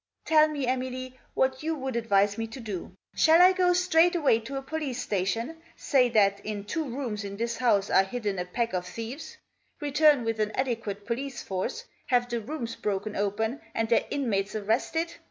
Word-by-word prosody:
" - - -51
Tell 310 -1 +5
me, 295 -3 -3
Emily, 255 0 -3 0.2
what 265 0 +1
you 320 +1 -1
would 265 -3 -4
advise 205 -3 +2
me 225 +1 -3
to 225 +4 -9
do. 200 -5 -6 0.2
Shall 320 +1 +5
I 365 +1 +8
go 365 -1 +3
straight 355 -1 +4
away 285 -9 +3
to 265 +5 -6
a - - -3
police 290 -3 -3
station; 220 - -2 0.2
say 255 -4 +2
that 200 -3 +3
in 210 -1 -4
two 310 +10 -2
rooms 240 -5 -4
in 200 0 -6
this 235 +1 -2
house 210 -6 +2
are 190 - +6
hidden 205 -2 -3
a 180 - -2
pack 230 +5 -2
of 180 -1 -2
thieves; 230 - -7 0.4
return 295 -2 +4
with 225 -1 -2
an 215 0 0
adequate 225 -6 -2
police 255 +2 -4
force, 195 - -3 0.2
have 245 -2 +2
the 240 -1 -2
rooms 235 -1 -5
broken 205 +1 -3
open 220 +5 -1
and 225 0 0
their 235 - +3
inmates 210 -8 -1
arrested 235 +11 -1
235 Hz, 190 wpm, -27 LUFS, 210-280 Hz, 0.4 s, I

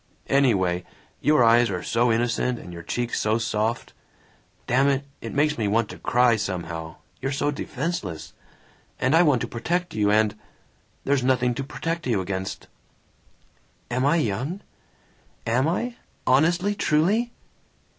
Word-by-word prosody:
"Anyway, 95 -10 +3 0.4
your 150 -2 +4
eyes 115 0 +5
are 90 -2 -3
so 120 +1 +2
innocent 120 +2 0
and 90 -5 -10
your 85 - -7
cheeks 120 +7 -2
so 110 +1 +2
soft 110 +1 -2 0.7
Damn 135 +3 +3
it, 140 0 +1 0.2
it - - -6
makes 150 -1 +1
me 105 - +1
want 110 +1 +1
to - - -9
cry, 120 -1 +3
somehow, 85 -4 -4 0.3
you're 135 - -1
so 145 +1 0
defenseless; 140 - -4 0.7
and 130 - +2
I 165 - +7
want 145 -8 +3
to 120 - -2
protect 175 +10 -2
you 105 -1 +1
and 105 0 +3 0.7
There's 140 -2 +1
nothing 125 -1 +2
to 135 - -4
protect 165 +2 -4
you 115 -5 +1
against!" 95 0 -4 1.2
"Am 125 +2 0
I 145 +4 +4
young? 150 - -1 0.8
Am 125 +5 +2
I? 235 +8 -2 0.3
Honestly? 170 +9 +3
Truly?" 200 +7 +1
125 Hz, 145 wpm, -24 LUFS, 110-150 Hz, 1.2 s, I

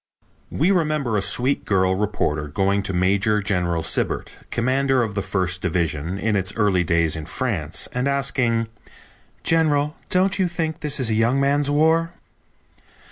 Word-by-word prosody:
We 170 +6 +1
remember 155 - 0
a 100 - +1
sweet 130 +7 +1
girl 95 -2 +2
reporter 95 -7 -1
going 100 +6 0
to 95 - -3
Major 100 +4 +2
General 90 -5 -1
Sibert, - - -1
commander 130 +1 +1
of 110 -3 -4
the 100 - -2
First 95 -2 -1
Division 85 -1 -2
in 110 +1 0
its 95 -1 -1
early 100 -5 +2
days 85 -1 +1
in 80 -1 -6
France, 85 - -2
and 125 +2 -1
asking: 130 -4 0 0.8
"General, 150 -2 +1
don't 190 +2 +2
you 185 - +2
think 165 -2 -3
this 150 -1 -1
is 120 -4 +1
a - - +1
young 115 +5 +2
man's 140 +1 +1
war?" 160 +3 +2
110 Hz, 155 wpm, -22 LUFS, 95-140 Hz, 0.8 s, girl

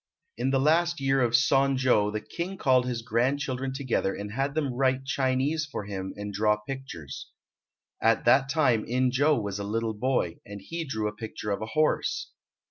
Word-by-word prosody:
In 125 +3 -1
the 135 - +2
last 170 +4 +2
year 135 0 +2
of 120 -1 +2
Son 135 +2 +3
jo 120 -5 +3
the 105 0 -3
King 180 - -5
called 130 -6 +3
his 120 -2 -3
grandchildren 130 +3 0
together 130 -7 -1
and 105 +1 -6
had 135 +5 -2
them 145 -5 0
write 130 +1 +1
Chinese 135 +4 0
for 105 - -4
him 95 -1 -5
and 105 0 -5
draw 105 +1 +2
pictures. 105 - -8 0.7
At - - +3
that 135 0 +5
time 135 -8 +2
In 125 +1 +1
jo 145 +2 +3
was 100 -2 -4
a - - -3
little 110 +2 -1
boy, 110 -7 -1
and 100 0 -9
he 165 - -5
drew 110 -6 -2
a 105 - -4
picture 110 -1 -5
of 100 - -2
a 110 - -3
horse. 155 0 +1
130 Hz, 190 wpm, -27 LUFS, 105-135 Hz, 0.7 s, that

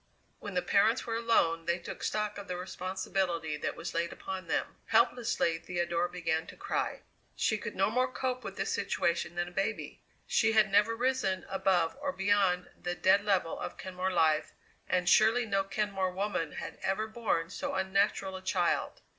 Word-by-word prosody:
When - - -7
the - - +1
parents - - +3
were 230 - -2
alone 165 -8 +2
they 170 0 +1
took 175 - -8
stock 210 -1 -1
of 200 - -9
the 180 - -3
responsibility 185 -3 -2
that - - -3
was - - -6
laid 170 0 -1
upon 190 -2 -6
them. - - -1
Helplessly 220 -9 +2
Theodora 175 0 -1
began 165 -2 -1
to - - -10
cry. 400 +1 -2 0.3
She 220 - +1
could - - -6
no 195 +2 +2
more 255 +2 +1
cope 255 -1 -2
with - - -6
this - - -1
situation 170 0 0
than 175 0 -1
a - - -9
baby. 195 +5 -3 0.2
She 225 -1 +2
had 215 -2 +4
never 210 +3 +4
risen 240 -7 0
above 190 -3 +1
or 285 -1 -1
beyond 195 -3 +2
the 175 0 -2
dead 200 +3 +4
level 190 -5 +1
of - - -5
Kenmore 185 0 -3
life, 155 -3 +2 0.4
and 180 -1 +1
surely 225 +5 +5
no 195 -2 +1
Kenmore 195 -1 -1
woman 180 -5 -2
had - - -7
ever 195 +3 0
borne 215 -7 -1
so - - -3
unnatural 190 0 +1
a 190 - -6
child. 185 - 0
190 Hz, 180 wpm, -31 LUFS, 175-215 Hz, 0.4 s, surely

